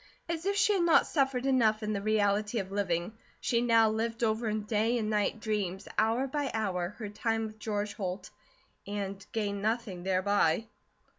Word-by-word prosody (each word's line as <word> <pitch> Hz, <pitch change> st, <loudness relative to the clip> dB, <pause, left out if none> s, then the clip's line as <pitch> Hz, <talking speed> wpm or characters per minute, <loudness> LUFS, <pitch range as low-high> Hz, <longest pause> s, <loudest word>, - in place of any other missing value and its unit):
As 335 Hz, +2 st, -3 dB
if 400 Hz, -, +1 dB
she 405 Hz, +1 st, +4 dB
had 385 Hz, -, +2 dB
not 340 Hz, -1 st, +5 dB
suffered 270 Hz, -3 st, 0 dB
enough 225 Hz, -5 st, +3 dB
in 215 Hz, 0 st, -1 dB
the 200 Hz, -, -2 dB
reality 210 Hz, +1 st, +1 dB
of 195 Hz, -2 st, -3 dB
living, 185 Hz, -1 st, -1 dB, 0.3 s
she 235 Hz, -2 st, +1 dB
now 230 Hz, -2 st, +5 dB
lived 225 Hz, +2 st, -1 dB
over 225 Hz, +1 st, +1 dB
in 215 Hz, 0 st, -1 dB
day 220 Hz, +2 st, +1 dB
and 215 Hz, -2 st, -1 dB
night 210 Hz, +1 st, 0 dB
dreams, 205 Hz, -4 st, -2 dB
hour 225 Hz, +4 st, +2 dB
by 280 Hz, 0 st, -2 dB
hour, 190 Hz, -3 st, -1 dB
her 220 Hz, -, -5 dB
time 225 Hz, +1 st, -1 dB
with 215 Hz, 0 st, -9 dB
George 210 Hz, -1 st, -2 dB
Holt, 185 Hz, -1 st, -5 dB, 0.6 s
and 200 Hz, -1 st, -4 dB
gained 205 Hz, -2 st, -2 dB
nothing 215 Hz, -4 st, -1 dB
thereby. 190 Hz, +1 st, +2 dB
215 Hz, 175 wpm, -30 LUFS, 200-230 Hz, 0.6 s, not